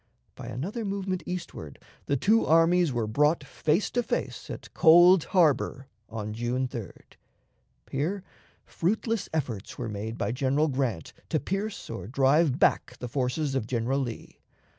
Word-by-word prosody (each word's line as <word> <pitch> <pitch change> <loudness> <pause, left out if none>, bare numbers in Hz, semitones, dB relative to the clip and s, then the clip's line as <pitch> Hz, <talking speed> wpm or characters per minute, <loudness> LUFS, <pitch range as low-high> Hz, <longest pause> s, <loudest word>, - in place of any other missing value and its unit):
By - - -9
another 190 - -4
movement 195 -2 -2
eastward 165 - -6 0.3
the 140 - +1
two 220 - +3
armies 165 0 +4
were 120 -3 -1
brought 150 +8 +2
face 155 +6 0
to 245 - +1
face 235 - -3
at - - -8
Cold 175 +1 +7
Harbor 145 -6 +1 0.2
on 105 -1 -5
June 120 +3 -1
3d. 115 -7 -8 0.9
Here 175 +8 -2 0.4
fruitless 220 +4 -1
efforts 125 -10 -4
were 120 -2 -4
made 110 +2 -5
by - - -1
General 140 +4 +1
Grant 130 - -2 0.2
to - - +1
pierce 195 +2 -4
or 105 -5 -6
drive 135 +3 +3
back - - +2
the 125 - -6
forces 135 +3 -1
of 130 -5 -1
General 125 +3 0
Lee. 120 -4 -6
140 Hz, 145 wpm, -27 LUFS, 120-175 Hz, 0.9 s, Cold